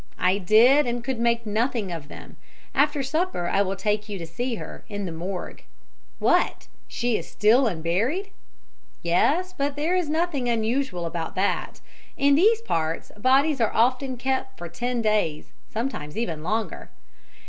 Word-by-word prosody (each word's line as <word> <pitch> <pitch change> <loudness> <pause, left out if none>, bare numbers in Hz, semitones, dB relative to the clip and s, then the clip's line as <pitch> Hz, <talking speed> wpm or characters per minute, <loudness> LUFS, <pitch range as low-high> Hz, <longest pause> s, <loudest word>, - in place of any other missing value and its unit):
"I 185 +2 +2
did, 235 +9 +5
and 240 0 -2
could 255 -1 -3
make 235 0 +1
nothing 220 -1 -1
of 160 -4 -6
them. - - -11 0.4
After 290 0 +2
supper 310 - -1
I 195 - +2
will 195 -1 0
take 210 +2 -1
you 205 - -4
to 170 - -6
see 240 +9 -3
her, - - -8
in 205 -1 -4
the 175 - -4
morgue." 180 +3 -6 0.5
"What - - +1 0.2
she 240 -2 0
is - - -9
still 235 +5 +4
unburied?" 220 - -1 0.7
"Yes 300 - +2
but 280 -3 -1
there 315 +5 0
is 355 -4 0
nothing 310 -6 0
unusual 225 -5 0
about 165 -1 -4
that. 190 +2 -1 0.4
In 280 0 +4
these 430 +9 +4
parts 160 - -2
bodies 270 +5 +3
are 225 - +2
often 255 +2 +2
kept 265 +1 -2
for 175 - -6
ten 240 +6 -2
days 210 -8 0 0.2
sometimes 220 - -4
even 170 -10 -2
longer." 215 +7 -3
230 Hz, 160 wpm, -25 LUFS, 190-275 Hz, 0.7 s, did